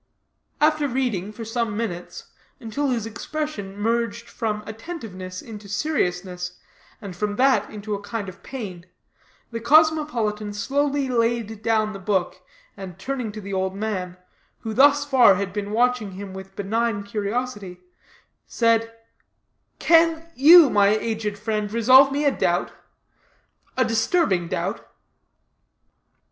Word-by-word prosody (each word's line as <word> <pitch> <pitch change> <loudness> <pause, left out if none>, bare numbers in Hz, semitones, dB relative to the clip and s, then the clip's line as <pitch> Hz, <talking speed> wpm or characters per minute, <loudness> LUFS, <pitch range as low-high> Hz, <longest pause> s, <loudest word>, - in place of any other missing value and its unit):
After 305 -1 +3
reading 240 -7 -2
for 225 +1 -8
some 225 -2 -2
minutes, 175 -6 -5 0.3
until 240 +6 -3
his 235 -4 -1
expression 225 -4 -5
merged 230 +1 -1
from 215 -3 -3
attentiveness 220 - -8
into 210 -3 -10
seriousness, 180 - -2 0.4
and 200 -5 -8
from 205 +2 -2
that 265 +3 +3
into 210 0 -6
a 200 - -3
kind 205 0 -5
of 185 - -10
pain, 190 -9 -8 0.6
the 230 - -4
cosmopolitan 240 -7 +2
slowly 280 +5 0
laid 230 -3 -1
down 215 -1 +1
the 195 - -7
book, 190 -2 -1 0.3
and 185 -3 -9
turning 255 -5 -4
to 215 - -7
the 200 0 -7
old 190 0 -1
man, 190 -4 -4 0.4
who 220 -1 -4
thus 285 +3 +5
far 250 -8 +6
had 195 -1 -3
been 205 -1 -3
watching 235 -2 +1
him 195 0 -8
with 190 0 -10
benign 220 +1 -1
curiosity, 205 -2 -4 0.7
said: 230 -1 +1 0.9
"Can 330 0 +3
you, 315 +1 +8
my 205 -1 +4
aged 215 0 -1
friend, 210 -1 -2
resolve 255 +5 +6
me 290 +2 -1
a 285 - +4
doubt - - 0 1.1
a 255 - +3
disturbing 225 - +1
doubt?" - - -3
220 Hz, 130 wpm, -23 LUFS, 200-255 Hz, 1.1 s, you